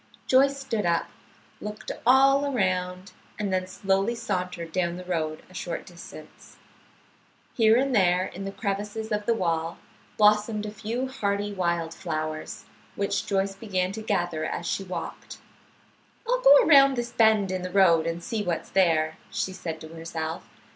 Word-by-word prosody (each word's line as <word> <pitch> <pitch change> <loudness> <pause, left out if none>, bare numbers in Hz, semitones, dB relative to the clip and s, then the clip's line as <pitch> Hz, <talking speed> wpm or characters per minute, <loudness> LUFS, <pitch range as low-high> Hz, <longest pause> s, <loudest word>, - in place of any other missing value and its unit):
Joyce 275 +2 +4
stood 235 -6 -2
up, 170 -1 +1 0.5
looked 210 0 -6 0.2
all 275 +2 +5
around, 185 -4 -1 0.3
and 205 -3 -2
then 185 0 0
slowly 195 +4 0
sauntered 180 -6 -3
down 175 -1 -1
the 180 - -7
road 155 -3 -2
a - - -18
short 180 -2 -5
distance. 170 -3 -13 1.0
Here 225 -1 +5
and 270 +1 +1
there 185 -3 +3
in 195 - -7
the 195 - -4
crevices 205 +2 -4
of 210 0 -2
the 230 - +3
wall 165 -4 -1 0.4
blossomed 210 0 +3
a 210 - -5
few 225 +5 -3
hardy 205 -5 -2
wild 170 -3 -1
flowers, 155 -3 -5 0.3
which 200 0 -1
Joyce 195 -1 0
began 190 -3 -2
to 220 +2 -6
gather 175 -7 -1
as 170 +2 -3
she 195 - -1
walked. 185 -1 -7 0.9
"I'll - - +1
go - - +8
around 275 -3 +7
this 240 -1 -3
bend 220 -4 +3
in 185 -1 -2
the 185 - -4
road 175 -4 +4
and 165 +1 -3
see 220 +3 -2
what's 175 -5 -3
there," 160 -4 +2
she 190 - -2
said 165 -3 -6
to 160 - -9
herself. 165 0 -6
195 Hz, 160 wpm, -26 LUFS, 170-220 Hz, 1.0 s, go